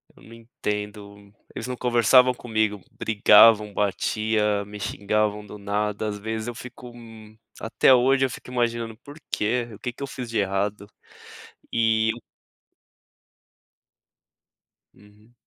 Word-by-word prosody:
Eu -, -, -20 dB
não 115 Hz, -, -14 dB
entendo, 105 Hz, -3 st, -7 dB, 0.2 s
eles 115 Hz, -, -5 dB
não 125 Hz, 0 st, -5 dB
conversavam 125 Hz, +1 st, +4 dB
comigo, 110 Hz, -4 st, -2 dB
brigavam, 105 Hz, 0 st, +5 dB
batia, 105 Hz, +1 st, 0 dB
me 105 Hz, +1 st, -10 dB
xingavam 105 Hz, +1 st, -1 dB
do 105 Hz, -, -10 dB
nada, 105 Hz, +1 st, -2 dB
às 105 Hz, -1 st, -4 dB
vezes 110 Hz, +1 st, -4 dB
eu 120 Hz, -, -5 dB
fico, 125 Hz, 0 st, -10 dB
hum, 110 Hz, -2 st, -14 dB, 0.2 s
até 115 Hz, +3 st, +3 dB
hoje 135 Hz, +2 st, +3 dB
eu -, -, -2 dB
fico 125 Hz, -, -10 dB
imaginando: 115 Hz, -2 st, -2 dB
"Por 145 Hz, -, -12 dB, 0.2 s
quê? 120 Hz, +3 st, -1 dB
O 105 Hz, -, -12 dB
que 125 Hz, -, -5 dB
que 140 Hz, -, -8 dB
eu -, -, -4 dB
fiz 125 Hz, -3 st, -7 dB
de 115 Hz, -, -3 dB
errado?" 100 Hz, +1 st, -2 dB, 0.9 s
E 110 Hz, -1 st, +2 dB, 2.8 s
Uhum. 105 Hz, +3 st, -22 dB
110 Hz, 130 wpm, -24 LUFS, 105-120 Hz, 2.8 s, brigavam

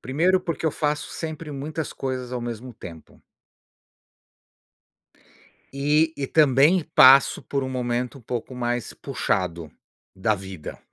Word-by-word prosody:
Primeiro, 175 Hz, +8 st, +2 dB
porque 165 Hz, -2 st, -3 dB
eu -, -, +3 dB
faço 150 Hz, 0 st, -2 dB
sempre 160 Hz, -1 st, -6 dB
muitas 150 Hz, +2 st, -5 dB
coisas 130 Hz, -2 st, -4 dB
ao 125 Hz, -, -3 dB
mesmo 120 Hz, +1 st, -6 dB
tempo. 80 Hz, -5 st, -12 dB, 2.5 s
E 150 Hz, +3 st, +2 dB
e 140 Hz, -, -2 dB
também 150 Hz, +4 st, +4 dB
passo 135 Hz, +1 st, +7 dB
por 140 Hz, -1 st, -2 dB
um 130 Hz, -, -4 dB
momento 125 Hz, 0 st, -2 dB
um -, -, -15 dB
pouco 120 Hz, +2 st, -5 dB
mais 120 Hz, -1 st, -2 dB
puxado, 85 Hz, -4 st, -2 dB, 0.4 s
da 100 Hz, +3 st, +1 dB
vida. 95 Hz, -5 st, -9 dB
130 Hz, 125 wpm, -24 LUFS, 120-150 Hz, 2.5 s, passo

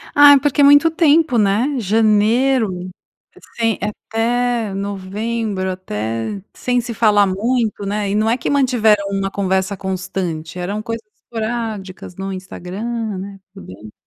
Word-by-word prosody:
Ah, 290 Hz, 0 st, +9 dB
é 280 Hz, -, +6 dB
porque 290 Hz, +1 st, +1 dB
é -, -, +6 dB
muito 290 Hz, +3 st, +7 dB
tempo, 320 Hz, -4 st, +3 dB
né? 220 Hz, +7 st, +2 dB
Janeiro, 215 Hz, -1 st, +2 dB, 0.7 s
sem 225 Hz, -3 st, 0 dB
até, 225 Hz, +1 st, -1 dB
novembro 200 Hz, +1 st, -3 dB
até, 115 Hz, -, -4 dB
sem 245 Hz, -1 st, 0 dB
se 235 Hz, 0 st, -6 dB
falar 210 Hz, -3 st, +4 dB
muito, 215 Hz, +2 st, -1 dB
né, 205 Hz, 0 st, -2 dB
e 200 Hz, -, -1 dB
não 215 Hz, +1 st, +2 dB
é 235 Hz, -, +2 dB
que 240 Hz, -, -3 dB
mantiveram 240 Hz, -7 st, +3 dB
uma 195 Hz, 0 st, -2 dB
conversa 190 Hz, 0 st, -1 dB
constante, 185 Hz, -3 st, -4 dB
eram 200 Hz, +4 st, -3 dB
coisas 230 Hz, 0 st, -5 dB, 0.2 s
esporádicas 220 Hz, -6 st, -5 dB
no 195 Hz, +1 st, -5 dB
Instagram, 185 Hz, +1 st, -7 dB, 0.4 s
né, 195 Hz, +1 st, -8 dB
também. 105 Hz, -, -11 dB
210 Hz, 135 wpm, -18 LUFS, 190-235 Hz, 0.7 s, Ah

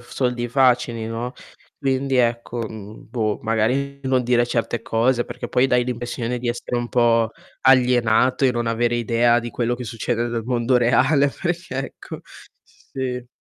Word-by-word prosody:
f 120 Hz, -, -18 dB
soldi 125 Hz, -2 st, -1 dB
facili, 125 Hz, -3 st, +2 dB
no, 115 Hz, +3 st, -4 dB, 0.4 s
quindi 135 Hz, -1 st, 0 dB
ecco, 120 Hz, -1 st, 0 dB
mhmm, 110 Hz, 0 st, -11 dB
boh, 110 Hz, -4 st, -1 dB
magari 125 Hz, +6 st, 0 dB
non 130 Hz, -1 st, +2 dB
dire 120 Hz, 0 st, +2 dB
certe 120 Hz, -1 st, -1 dB
cose, 120 Hz, +2 st, +1 dB
perché -, -, -7 dB
poi 125 Hz, +2 st, +3 dB
dai 125 Hz, -1 st, +2 dB
l'impressione 120 Hz, 0 st, -3 dB
di 120 Hz, 0 st, -3 dB
essere 120 Hz, +1 st, -3 dB
un 120 Hz, 0 st, -3 dB
po' 115 Hz, -2 st, +3 dB, 0.3 s
alienato 125 Hz, 0 st, +4 dB
e 125 Hz, -, +2 dB
non 120 Hz, -1 st, -2 dB
avere 120 Hz, +1 st, +1 dB
idea 120 Hz, +1 st, +3 dB
di 120 Hz, 0 st, -5 dB
quello 120 Hz, 0 st, -1 dB
che 125 Hz, 0 st, -7 dB
succede 120 Hz, +1 st, -2 dB
nel 115 Hz, -2 st, -3 dB
mondo 125 Hz, 0 st, +1 dB
reale, 135 Hz, +4 st, +3 dB
perchè 170 Hz, -3 st, -4 dB
ecco. -, -, -10 dB, 0.4 s
S -, -, -28 dB
sì. 125 Hz, -2 st, -4 dB
120 Hz, 165 wpm, -22 LUFS, 115-130 Hz, 0.4 s, alienato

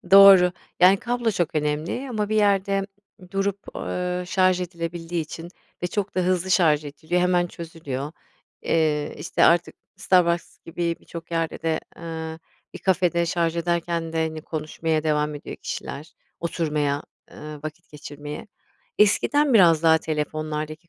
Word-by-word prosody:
Doğru, 195 Hz, -2 st, +9 dB, 0.3 s
yani 185 Hz, +2 st, +7 dB
kablo 240 Hz, +1 st, -1 dB
çok 175 Hz, -6 st, -1 dB
önemli 155 Hz, -, -1 dB
ama 210 Hz, -3 st, -1 dB
bir 215 Hz, -, 0 dB
yerde 195 Hz, -1 st, +2 dB, 0.4 s
durup, 195 Hz, +1 st, -3 dB
ııı, 180 Hz, 0 st, -3 dB
şarj 185 Hz, 0 st, +2 dB
edilebildiği 170 Hz, -1 st, -4 dB
için 165 Hz, +2 st, -8 dB, 0.3 s
ve -, -, +1 dB
çok 200 Hz, +2 st, -3 dB
da 185 Hz, -, +1 dB
hızlı 185 Hz, 0 st, 0 dB
şarj 155 Hz, -5 st, +4 dB
ediliyor, 155 Hz, +5 st, -2 dB
hemen 180 Hz, -1 st, +2 dB
çözülüyor. 160 Hz, -4 st, -6 dB, 0.5 s
Eee, 150 Hz, -2 st, +1 dB
işte, -, -, +1 dB
artık 170 Hz, 0 st, +3 dB, 0.2 s
Starbucks 175 Hz, -2 st, +2 dB
gibi 170 Hz, 0 st, -2 dB
birçok 170 Hz, 0 st, -10 dB
yerde 165 Hz, -1 st, -2 dB
de, 160 Hz, -1 st, 0 dB, 0.2 s
ııı, 160 Hz, -1 st, -6 dB, 0.4 s
bir -, -, -6 dB
kafede 180 Hz, -2 st, +2 dB
şarj 170 Hz, -1 st, 0 dB
ederken 170 Hz, -1 st, -1 dB
de, 160 Hz, 0 st, +1 dB
hani, 160 Hz, -1 st, -6 dB
konuşmaya 155 Hz, 0 st, -2 dB
devam 150 Hz, -1 st, 0 dB
ediyor 145 Hz, -, -8 dB
kişiler, 155 Hz, +3 st, -6 dB, 0.3 s
oturmaya, 150 Hz, -4 st, -1 dB, 0.3 s
ııı, 150 Hz, -1 st, -9 dB
vakit 155 Hz, +3 st, -8 dB
geçirmeye. 150 Hz, 0 st, -8 dB, 0.5 s
Eskiden 275 Hz, +7 st, +3 dB
biraz 170 Hz, -6 st, +6 dB
daha 160 Hz, -1 st, +6 dB
telefonlardaki 155 Hz, +1 st, -4 dB
170 Hz, 140 wpm, -24 LUFS, 155-180 Hz, 0.5 s, Doğru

